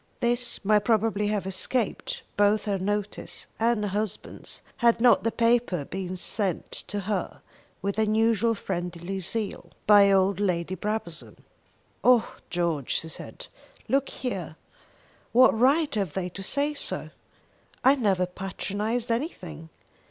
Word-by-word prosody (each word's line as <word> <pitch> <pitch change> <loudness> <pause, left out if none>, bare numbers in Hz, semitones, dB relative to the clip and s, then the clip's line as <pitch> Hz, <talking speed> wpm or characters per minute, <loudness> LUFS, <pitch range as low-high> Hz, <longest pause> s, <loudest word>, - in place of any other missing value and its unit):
This 240 -2 +1
might 210 0 +4
probably 215 -2 +2
have 205 -2 -1
escaped 255 - -1
both 205 +1 +3
her 200 -2 0
notice 205 +2 -3
and 230 -1 +2
her 205 - -1
husband's, 210 +1 -4
had 235 -1 +4
not 245 +1 +5
the 230 - +1
paper 230 - +2
been 185 +1 -5
sent 190 -1 -1
to 205 0 -4
her, 195 -2 -3 0.4
with 200 +2 -1
usual 225 +1 +2
friendly 180 -1 -4
zeal, 205 +3 -4 0.2
by 205 -1 +7
old 195 0 +3
Lady 180 -3 0
Brabazon. 205 -3 -4 0.7
"Oh 245 -2 +4
George," 170 -6 0
she 160 - -6
said, - - -8 0.4
"look 275 0 +1
here. 185 - -4 0.8
What 255 +2 +7
right 280 +6 +3
have 195 -8 -1
they 185 -2 -2
to 195 - -8
say 285 +9 0
so? 290 - -4 0.7
I 265 - +7
never 200 -9 +1
patronised 205 +6 -3
anything. 180 - -4
205 Hz, 130 wpm, -26 LUFS, 185-230 Hz, 0.8 s, by